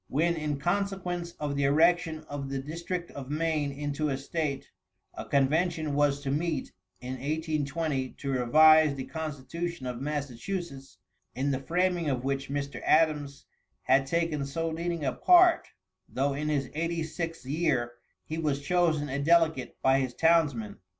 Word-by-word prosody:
When, 165 +5 +1
in 150 -2 -2
consequence 180 +1 -2
of 145 -1 -4
the 140 0 +1
erection 160 +2 +3
of 145 -3 -6
the 135 - -2
district 170 +5 -5
of 135 -2 -8
Maine 155 -1 0
into 145 +1 -2
a 135 - -1
State, 140 0 -3 0.4
a - - -7
convention 155 +3 +1
was 145 -1 +2
to 135 -1 -3
meet 160 +2 -1 0.3
in 130 +1 -5
1820 150 -1 -2
to 140 - -5
revise 155 +4 +6
the 135 - -4
constitution 160 +1 -5
of 125 -1 -4
Massachusetts, 145 - -5 0.4
in 140 +2 0
the 130 - -1
framing 175 +2 0
of 130 -2 -1
which 135 0 -2
Mr. 140 0 -4
Adams 150 -3 +2 0.4
had 135 +1 +3
taken 165 -2 0
so 165 +4 -2
leading 170 -1 -3
a 130 - 0
part, 355 -1 +5 0.4
though 140 +2 0
in 150 +2 -2
his 140 -3 -1
eighty 165 +1 -1
sixth 165 -1 -5
year, 130 -5 0 0.3
he 160 +1 -4
was 150 -3 0
chosen 155 0 +1
a 140 +1 -3
delegate 160 -2 +2
by 135 +1 +4
his 130 -2 -2
townsmen. 150 -11 +2
150 Hz, 155 wpm, -28 LUFS, 140-165 Hz, 0.4 s, revise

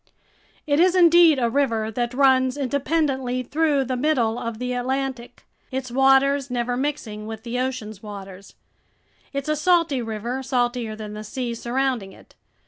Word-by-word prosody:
It 290 -1 +1
is 365 +1 +4
indeed 340 -3 +6
a 240 -2 +1
river 230 -4 0
that 240 +2 -2
runs 260 -1 +3
independently 270 -2 -1
through 295 +1 +1
the 255 0 -3
middle 245 -4 +1
of 230 -1 -4
the 250 +1 -3
Atlantic, 255 0 -3 0.2
its 260 -2 -4
waters 270 +1 +3
never 245 0 -1
mixing 245 -6 -4
with 220 0 -7
the 245 +1 -3
ocean's 230 -6 -4
waters. 195 -2 -10 0.8
It's 275 0 -4
a 305 - +1
salty 325 -4 +2
river, 230 +3 -4
saltier 245 -3 -1
than 215 -1 -7
the 210 0 -7
sea 240 +3 -4
surrounding 240 -4 -2
it. - - -19
255 Hz, 150 wpm, -23 LUFS, 230-275 Hz, 0.8 s, indeed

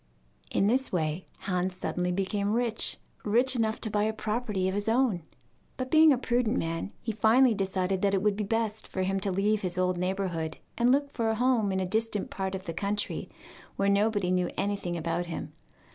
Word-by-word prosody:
In - - +1
this 255 +5 +2
way 160 0 -1
Hans 180 0 -1
suddenly 180 -1 -1
became 200 +2 -1
rich 230 -1 +1 0.3
rich 245 +5 +3
enough 220 -2 0
to 220 - -2
buy 210 0 +2
a 220 - 0
property 215 -3 -1
of 190 - -1
his 205 +2 -1
own. 230 -6 +2 0.6
But 255 -1 -4
being 315 0 +7
a 270 - +4
prudent 245 -1 +1
man, 165 +4 -2
he 230 - -1
finally 225 +4 +4
decided 190 -1 -1
that 200 -1 +2
it 190 - 0
would 210 -1 +2
be 210 - -2
best 220 0 -1
for 185 - -2
him 195 +1 0
to 195 0 -1
leave 205 +3 +1
his 180 -1 -2
old 180 -1 +1
neighbourhood 180 -4 -2 0.2
and 240 +1 +3
look 280 +1 +2
for 230 -4 -1
a 220 - +1
home 240 -4 +2
in 190 - 0
a 190 - 0
distant 215 +1 -1
part 190 0 -3
of 190 - -6
the 170 -3 -5
country, 205 +4 -2 0.5
where 200 0 +1
nobody 200 -2 +2
knew 180 -1 +1
anything 200 -4 -1
about 170 +2 -2
him. 170 - -6
205 Hz, 205 wpm, -28 LUFS, 185-225 Hz, 0.6 s, being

